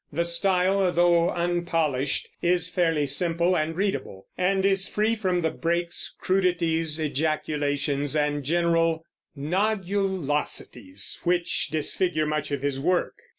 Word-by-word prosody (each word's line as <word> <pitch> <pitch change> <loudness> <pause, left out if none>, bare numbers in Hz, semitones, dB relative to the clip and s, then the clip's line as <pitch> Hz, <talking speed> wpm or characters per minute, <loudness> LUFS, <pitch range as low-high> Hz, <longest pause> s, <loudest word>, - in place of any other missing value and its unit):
The 170 - 0
style, 185 +2 +2
though 175 -1 +3
unpolished, 165 -6 0
is 175 0 +2
fairly 165 -5 +1
simple 170 +5 +1
and 155 0 -1
readable, 140 - -3
and 190 +1 +1
is 195 0 +2
free 215 +2 +1
from 185 -5 0
the 160 - 0
breaks, 170 +1 -2
crudities, 165 -4 0
ejaculations, 145 -1 -1
and 145 -1 0
general 165 +1 +1 0.3
"nodulosities" 180 - -1
which 175 -1 +1
disfigure 155 +1 0
much 150 -1 -2
of 140 -2 -3
his 140 -1 -1
work. 180 +5 +1
170 Hz, 115 wpm, -25 LUFS, 150-180 Hz, 0.3 s, though